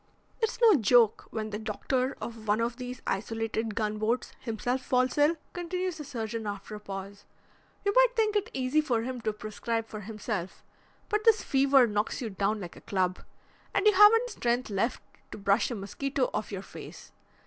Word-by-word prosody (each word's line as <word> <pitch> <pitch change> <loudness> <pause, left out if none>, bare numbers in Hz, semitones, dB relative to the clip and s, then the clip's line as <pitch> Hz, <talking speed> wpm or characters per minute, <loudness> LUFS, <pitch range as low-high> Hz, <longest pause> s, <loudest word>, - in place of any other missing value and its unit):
"It's 450 +1 0
no 460 -3 +7
joke 230 -1 +4
when 215 -1 -4
the 210 - -3
doctor 255 +5 -1
of 225 -2 -7
one 210 +2 +3
of 235 +1 -1
these 250 -1 -7
isolated 225 +1 -2
gunboats 215 +2 -1
himself 245 +2 -2
falls 255 0 +1
ill," 295 +3 +4 0.2
continues 360 0 -3
the - - -4
surgeon 230 -5 -4
after 205 +1 -6
a 210 - -6
pause. 200 0 -8 0.6
"You 405 - +2
might - - +5
think 435 -2 +2
it 415 +2 +1
easy 265 +3 +1
for 245 -7 0
him 255 0 -4
to 220 -1 0
prescribe 215 +2 -3
for 215 -1 -8
himself, 210 -3 -5 0.4
but 425 0 0
this 445 -1 +5
fever 270 -1 +5
knocks 210 -1 -1
you 230 -4 -4
down 200 +2 0
like 175 -4 -8
a - - -13
club, 185 -2 -1 0.6
and 395 - +2
you 425 - +7
haven't 455 +5 +7
strength 240 -1 -1
left 205 +5 -1 0.3
to - - -7
brush 200 -1 +2
a 240 - -3
mosquito 255 +7 -2
off 215 - -3
your 195 -1 -5
face. - - -11
230 Hz, 180 wpm, -29 LUFS, 210-275 Hz, 0.6 s, no